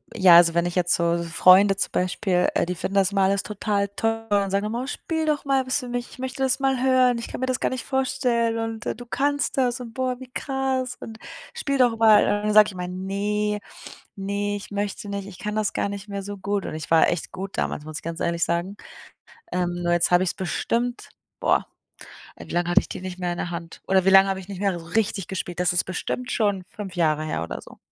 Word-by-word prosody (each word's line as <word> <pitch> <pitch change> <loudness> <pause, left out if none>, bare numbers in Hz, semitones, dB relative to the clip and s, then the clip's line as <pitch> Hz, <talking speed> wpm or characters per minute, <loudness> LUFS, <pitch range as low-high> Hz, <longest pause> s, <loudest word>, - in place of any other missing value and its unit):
ja. 180 -2 +7
Also 170 -1 +6
wenn 170 0 +2
ich 175 - -5
jetzt 175 -1 +2
so 170 0 +1
Freunde 185 +4 +5
zum - - -2
Beispiel, 180 0 +1
äh, - - +1
die 180 - -2
finden 195 +3 -4
das 195 0 +3
immer 195 -1 +1
alles 195 +1 +2
total 205 -1 -1
toll 225 +2 -2
und 200 -1 +1
sagen 200 +1 +1
immer: 235 +4 -2
„Oh, - - -5
spiel 320 +2 -3
doch 300 -1 0
mal 270 -2 +1
was 255 +3 0
für 250 - -7
mich. 245 0 -4
Ich - - -14
möchte 260 +1 -3
das 260 0 +1
mal 270 -2 +1
hören. 255 -2 +4
Ich 230 - -5
kann - - -7
mir 260 - -1
das 255 -1 0
gar - - +1
nicht 255 -3 -4
vorstellen 250 -4 0
und 225 -1 -4
du 245 - -8
kannst 285 +2 0
das 250 -1 +1
und 230 -2 -8
boah, 255 -1 -1
wie 260 -1 -10
krass 265 -2 -2
und 220 -1 -9 0.4
spiel 280 -12 -1
doch 240 -3 +4
mal.” 220 -2 +6
Und - - +1
dann 210 +1 0
sage 215 0 +8
ich 200 - -7
immer: 180 -1 -5
„Ne, 205 +3 -2 0.6
ne, 200 +1 -2
ich 205 - -8
möchte 205 0 -3
nicht, 200 -1 -4
ich 180 - -10
kann 210 0 -4
das 215 -1 0
gar - - 0
nicht 200 0 -7
mehr 200 -1 -4
so 205 0 -6
gut.“ 200 0 -2
Und - - -5
ich 155 - -6
war 165 -1 +5
echt 175 - -2
gut 195 +1 -7
damals, 150 - -2
muss 155 -1 -6
ich - - -23
ganz 165 +1 -5
ehrlich 170 0 0
sagen. 175 +4 -1 0.7
Ähm, 180 -1 -1
nur 175 0 +1
jetzt 175 0 +2
habe 175 +1 +4
ich's 175 - -2
bestimmt 235 +7 -2 0.3
boah, - - +2 0.7
ey, - - -11
wie - - -9
lange 175 0 0
hatte 185 +3 +6
ich - - -6
die - - -6
nicht 185 0 -7
mehr 175 -1 -1
in - - -7
der 175 - -3
Hand? 170 -1 -7
Oder 190 -1 +3
wie - - +5
lange 195 0 +7
habe 190 0 -1
ich 185 - -11
nicht 195 -1 -7
mehr 175 -2 -2
richtig 205 -3 0
gespielt? 180 -2 -5
Das 180 0 +2
ist 180 - +2
bestimmt 250 +7 -4
schon 205 -4 0
5 195 -4 -8
Jahre 155 -2 +1
her 80 - -2
oder 85 - -6
so. - - -15
200 Hz, 250 wpm, -24 LUFS, 180-240 Hz, 0.7 s, sage